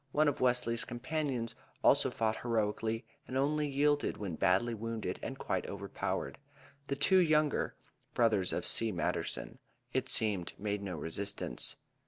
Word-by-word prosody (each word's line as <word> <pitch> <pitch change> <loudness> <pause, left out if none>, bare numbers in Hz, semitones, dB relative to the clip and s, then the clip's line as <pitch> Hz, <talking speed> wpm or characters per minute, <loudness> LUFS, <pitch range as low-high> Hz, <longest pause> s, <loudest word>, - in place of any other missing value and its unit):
One 155 +1 +4
of 145 - 0
Wesley's 125 -2 +2
companions 125 -1 -2 0.3
also - - +5
fought 110 -1 0
heroically 115 0 -1 0.2
and 130 - -2
only 150 +2 +2
yielded 145 +1 +2
when 100 -5 -4
badly 95 +9 +2
wounded 115 0 -3
and - - -5
quite - - -2
overpowered. - - -3 0.5
The 140 - -1
two 185 +7 +5
younger 155 -4 +2 0.4
(brothers 110 -6 +3
of - - -2
C. 115 -1 +3
Matterson) 85 -3 -3 0.3
it - - 0
seemed 100 -6 +1
made 105 0 -2
no 95 -4 -4
resistance. 90 -2 -2
115 Hz, 140 wpm, -33 LUFS, 105-140 Hz, 0.5 s, also